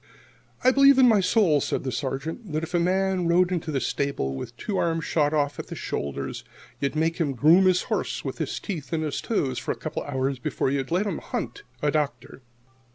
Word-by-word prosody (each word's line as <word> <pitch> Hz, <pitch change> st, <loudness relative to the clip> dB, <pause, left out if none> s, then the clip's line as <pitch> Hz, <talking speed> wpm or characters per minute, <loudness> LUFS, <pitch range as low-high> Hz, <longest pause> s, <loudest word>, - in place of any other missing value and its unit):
"I 255 Hz, -, +6 dB
believe 275 Hz, 0 st, +6 dB
in 260 Hz, -1 st, +7 dB
my 220 Hz, -4 st, +5 dB
soul," 185 Hz, -6 st, +3 dB
said -, -, -2 dB
the 130 Hz, -, -2 dB
Sergeant, 145 Hz, -, -4 dB
"that 155 Hz, +1 st, -1 dB
if 165 Hz, -, -6 dB
a 175 Hz, -, +3 dB
man 185 Hz, 0 st, +1 dB
rode 175 Hz, +2 st, +3 dB
into 170 Hz, -3 st, -2 dB
this 135 Hz, -3 st, -1 dB
stable 140 Hz, -, -1 dB
with 65 Hz, -, -5 dB
his -, -, -20 dB
two 200 Hz, -3 st, -2 dB
arms 165 Hz, -1 st, 0 dB
shot 150 Hz, -2 st, +1 dB
off 145 Hz, -2 st, 0 dB
at -, -, -6 dB
the -, -, -7 dB
shoulder, 70 Hz, -1 st, -3 dB, 0.5 s
you'd 140 Hz, +1 st, -1 dB
make 160 Hz, +1 st, +1 dB
him 150 Hz, -5 st, 0 dB
groom 165 Hz, +9 st, +6 dB
his 185 Hz, -1 st, +3 dB
horse -, -, -2 dB
with -, -, -4 dB
his -, -, -2 dB
teeth 160 Hz, -, -6 dB
and 160 Hz, -1 st, 0 dB
his 150 Hz, -2 st, -2 dB
toes 135 Hz, -, -1 dB
for -, -, -3 dB
a -, -, -2 dB
couple -, -, -5 dB
of 145 Hz, -, -7 dB
hours 130 Hz, 0 st, -1 dB
before 130 Hz, -, -1 dB
you'd 135 Hz, -1 st, -1 dB
let 180 Hz, +5 st, +1 dB
him 205 Hz, -, -2 dB
hunt 410 Hz, -, -5 dB, 0.2 s
a 145 Hz, -, +3 dB
doctor." 145 Hz, -3 st, -2 dB
160 Hz, 225 wpm, -25 LUFS, 140-185 Hz, 0.5 s, in